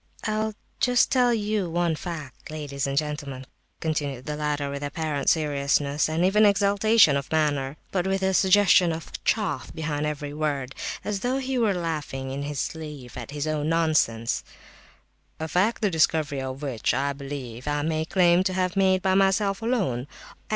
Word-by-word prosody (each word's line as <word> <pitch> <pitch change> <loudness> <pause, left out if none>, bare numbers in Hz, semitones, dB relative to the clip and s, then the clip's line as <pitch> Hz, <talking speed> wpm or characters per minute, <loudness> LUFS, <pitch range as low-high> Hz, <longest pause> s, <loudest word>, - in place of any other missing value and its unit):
"I'll 215 0 -1 0.2
just 245 -1 +3
tell 250 -2 +4
you 210 -4 0
one 170 -1 +1
fact, 155 -5 -7
ladies 145 -3 -3
and 135 0 -2
gentlemen," 145 -3 -3 0.3
continued 145 -5 -2
the 150 - -3
latter, 145 -1 -2
with 140 0 -5
apparent 145 0 -1
seriousness 145 -1 +1
and 165 +3 +1
even 210 +3 +4
exaltation 200 -3 +5
of 140 -1 -3
manner, 145 -3 0
but 185 -1 0
with 190 0 0
a 190 0 +2
suggestion 190 -2 +5
of 160 0 -7
"chaff" 190 - -1
behind 150 -1 -2
every 145 -1 -4
word, 145 -3 -2 0.3
as 205 -1 -1
though 250 +5 0
he 265 -1 -1
were 215 -5 +2
laughing 150 -6 -3
in 140 +1 -4
his 145 -1 -4
sleeve 150 -6 -6
at - - -7
his 145 0 -3
own 155 -1 -1
nonsense—"a 155 0 -2
fact, 195 +8 +1
the 205 - +2
discovery 155 -3 +1
of 130 +2 -5
which, 130 -6 -1
I 140 +1 0
believe, 135 -3 -7
I 145 0 0
may 155 0 0
claim 175 +1 +4
to 190 - 0
have 185 0 0
made 190 -1 +3
by 190 -1 +3
myself 195 +1 +2
alone. 190 - -1
155 Hz, 165 wpm, -25 LUFS, 140-190 Hz, 0.3 s, exaltation